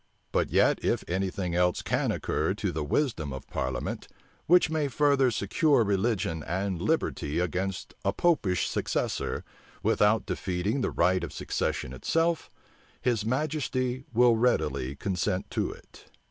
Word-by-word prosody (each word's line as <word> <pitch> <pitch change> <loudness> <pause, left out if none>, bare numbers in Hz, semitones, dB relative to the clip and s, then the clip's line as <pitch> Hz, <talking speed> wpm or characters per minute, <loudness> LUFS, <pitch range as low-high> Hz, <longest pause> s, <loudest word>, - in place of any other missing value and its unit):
But - - +1
yet, - - +3
if - - +1
any 95 +2 0
thing 90 -2 -3
else 90 0 +2
can - - 0
occur 80 +6 -1
to 100 -3 -2
the 80 -2 -2
wisdom 85 - 0
of 65 0 -7
parliament, 65 -1 -3 0.4
which 175 -1 +5
may 155 -2 +1
further 140 -1 +3
secure 120 - +2
religion 100 -5 0
and 95 +2 -2
liberty 75 +1 0
against 90 +2 -2
a - - +2
Popish 130 - +1
successor, - - -2 0.4
without 105 +2 +3
defeating 95 +6 -1
the - - +1
right 90 +1 +2
of 80 - -4
succession 65 - -2
itself, 165 - 0 0.5
his 120 -4 0
majesty 130 -2 -1
will 120 0 +5
readily 75 - +1
consent 90 +2 -2
to - - -1
it." - - -15
100 Hz, 140 wpm, -28 LUFS, 85-125 Hz, 0.5 s, which